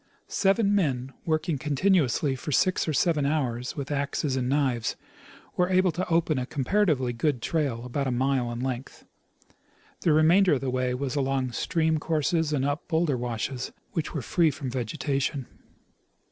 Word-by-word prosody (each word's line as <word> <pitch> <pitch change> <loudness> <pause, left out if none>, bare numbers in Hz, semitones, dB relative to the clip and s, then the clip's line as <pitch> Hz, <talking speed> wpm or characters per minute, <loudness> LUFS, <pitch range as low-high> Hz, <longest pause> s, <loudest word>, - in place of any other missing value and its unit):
Seven 200 +1 +2
men, 135 -9 0
working 155 -2 0
continuously 150 -2 +2
for 150 +4 -6
six 185 +5 +2
or - - +1
seven 155 0 +2
hours 130 -4 -1
with 140 0 -5
axes 140 -1 -1
and 125 -1 -1
knives, 130 -5 0 0.6
were 180 0 +2
able 185 -1 +3
to 180 +3 -3
open 165 -4 +2
a 125 - -3
comparatively 140 -4 +1
good 130 +2 0
trail 130 -4 -1
about 135 +2 -2
a - - 0
mile 130 -1 0
in 120 +1 -5
length. 130 0 -5 0.9
The 165 - +2
remainder 165 +5 +5
of 135 - 0
the 135 -2 -1
Avav 125 0 0
was 135 +1 -3
along 135 -2 0
stream 160 +6 0
courses 160 +1 0
and 135 -3 0
up 145 +3 -2
bowlder 160 -4 +1
washes, 125 +1 -3 0.2
which 160 - -2
were 145 - -2
free 170 +4 +3
from 140 -3 -5
vegetation. 135 +2 -2
140 Hz, 160 wpm, -27 LUFS, 130-160 Hz, 0.9 s, remainder